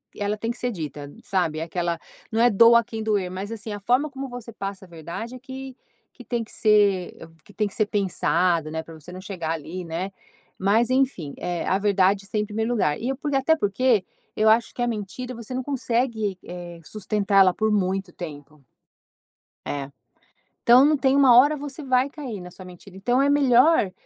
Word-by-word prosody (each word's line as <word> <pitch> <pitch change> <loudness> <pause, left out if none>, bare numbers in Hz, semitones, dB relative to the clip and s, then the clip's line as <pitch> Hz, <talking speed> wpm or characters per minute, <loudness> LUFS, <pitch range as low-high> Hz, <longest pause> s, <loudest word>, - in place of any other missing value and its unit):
ela 205 +1 -2
tem 225 +2 -2
que 240 - -7
ser 245 0 -2
dita 150 -5 -6
sabe, 175 -5 0
é - - -2
aquela, 170 0 -2 0.3
não 225 - 0
é 240 - +6
doa 230 +3 +7
a - - -1
quem 225 -1 -6
doer 205 -4 0
mas 195 +3 -5
assim, 220 -1 -6
a 205 - -5
forma 250 +8 +1
como 270 -1 -6
você 245 -2 -8
passa 195 -2 -6
a - - -18
verdade 170 +9 -7
é - - -10
que 265 0 -8 0.4
que 245 - -13
tem 235 -2 -2
que - - -13
ser 205 -4 +3 0.3
que 205 - -18
tem 210 0 0
que 195 - -10
ser 215 - +1
pensado 175 -5 +1
né, 160 0 -3
pra 165 - -12
você 160 +3 -12
não 185 - -8
chegar 175 -5 -4
ali 165 +3 -6
né 170 +4 -4 0.5
mas 215 +5 +3
enfim, 255 - 0
eh, 175 -1 -3
a 190 - +2
verdade 200 -1 +2
está 210 - -4
em 210 - +1
primeiro 220 +3 -2
lugar, 150 -11 +1
e 245 - -2
eu 270 - -2
por, 290 -1 -3
e - - +2
até 320 +4 +3
porque 210 -3 +1 0.3
eu 215 +1 +2
acho 225 +1 +3
que 245 - -5
a 240 - +1
mentira, 235 +3 -5
você 235 +2 -8
não 260 - -2
consegue 235 -6 -1
eh, 175 -1 -8
sustentar 205 -1 +1
ela 185 -1 +5
por 220 +3 0
muito 190 -2 -1
tempo. 150 -3 -9 1.0
É. 140 -1 -4 0.7
Então 250 +4 +7
não 300 0 +3
tem 265 0 +2
uma 270 -4 +6
hora 290 +5 +6
você 290 +1 -7
vai 260 +1 +2
cair 265 -9 -7
na 180 0 -10
sua 185 - -12
mentira. 180 +1 -13
Então 245 +7 +1
é 280 - +3
melhor 270 - +4
210 Hz, 210 wpm, -24 LUFS, 180-245 Hz, 1.0 s, doa